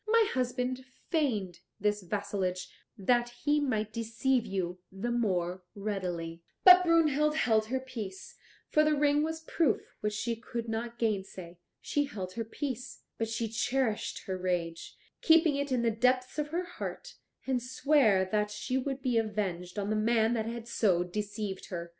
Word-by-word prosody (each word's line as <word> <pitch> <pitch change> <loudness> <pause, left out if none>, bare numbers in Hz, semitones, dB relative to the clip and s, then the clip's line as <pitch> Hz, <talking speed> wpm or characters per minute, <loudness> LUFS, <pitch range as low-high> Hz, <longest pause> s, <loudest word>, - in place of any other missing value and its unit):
My 455 0 +5
husband 255 0 -1 0.3
feigned 215 - 0 0.2
this 210 0 +1
vassalage 185 -1 -2 0.3
that 240 +4 +2 0.2
he 295 0 +4
might 220 -7 -1
deceive 230 +2 0
you 185 -2 -2
the 200 +6 -3
more 185 -6 0
readily." 180 -5 -3 0.2
But 365 -1 +10
Brunhild 305 -3 +3
held 220 -6 +2
her 260 +3 -1
peace, 220 -8 -7 0.3
for 305 - +4
the 305 0 +3
ring 290 0 +3
was 320 +1 -2
a - - -29
proof 315 -9 0
which 210 0 -1
she 230 +2 -1
could 235 0 -5
not 230 +1 -3
gainsay. 190 -6 -3 0.2
She 290 0 0
held 190 -9 -6
her 230 - -2
peace, 255 +2 -5 0.2
but 225 - 0
she 225 0 -1
cherished 230 0 -1
her 190 -1 -3
rage, 175 -2 -2 0.2
keeping 325 -2 +5
it 280 0 -2
in 250 -2 +1
the 230 - +3
depths 255 +5 +1
of 295 - 0
her 340 +4 -2
heart, 365 +7 -7 0.3
and 260 -2 0
sware 250 -6 +3
that 210 +2 0
she 255 +5 -2
would 270 0 -4
be 245 -3 +2
avenged 200 -5 -3
on 205 +1 -1
the - - +2
man 225 +1 +3
that 225 -2 -1
had 235 0 -5
so 185 -7 +2
deceived 205 +1 -4
her. 170 -2 -5
230 Hz, 165 wpm, -30 LUFS, 195-265 Hz, 0.3 s, But